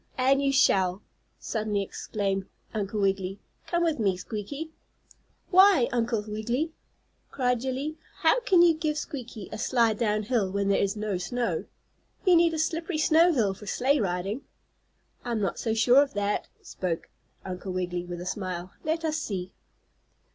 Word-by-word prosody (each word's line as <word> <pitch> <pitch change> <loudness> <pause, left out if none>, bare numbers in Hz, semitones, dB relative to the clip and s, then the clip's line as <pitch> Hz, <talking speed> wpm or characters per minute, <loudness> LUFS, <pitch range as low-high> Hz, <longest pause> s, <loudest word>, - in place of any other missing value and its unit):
"And 270 +2 +3
you 275 -1 +2
shall!" 190 -7 +3 0.3
suddenly 210 -2 -2
exclaimed 195 -1 -3 0.3
Uncle 210 -1 -2
Wiggily. 195 0 0 0.3
"Come 345 -1 +1
with 320 -5 +1
me, 195 -4 +1
Squeaky." 230 - -6 0.8
"Why, 375 -9 +6
Uncle 230 -3 0
Wiggily!" 235 +9 -2 0.6
cried 250 -2 0
Jillie. 270 +4 -3 0.2
"How - - +4
can 385 -8 +5
you 340 -1 +6
give 310 -1 -2
Squeaky 245 -9 -6
a 215 - -6
slide 230 -3 +2
down 215 -2 +1
hill 215 -4 +1
when 200 0 0
there 200 - +3
is 200 +1 0
no 210 -3 -2
snow? 235 +6 -2 0.6
You 365 -2 +6
need 335 -1 +4
a - - -2
slippery 325 +2 -1
snow 320 +3 +5
hill 220 - +1
for 205 +2 -12
sleigh 275 +6 +2
riding." 195 +4 -2 0.8
"I 240 - -3
am 225 - 0
not 195 - -1
so 225 -1 -1
sure 245 +4 +6
of 280 -5 -2
that," 205 0 -1 0.2
spoke 170 -3 -3 0.4
Uncle 185 0 -5
Wiggily, 180 -1 -2
with 175 0 -6
a - - -6
smile. 185 -1 -4
"Let 325 +1 -1
us 310 0 0
see." 190 - -4
225 Hz, 160 wpm, -27 LUFS, 195-285 Hz, 0.8 s, Why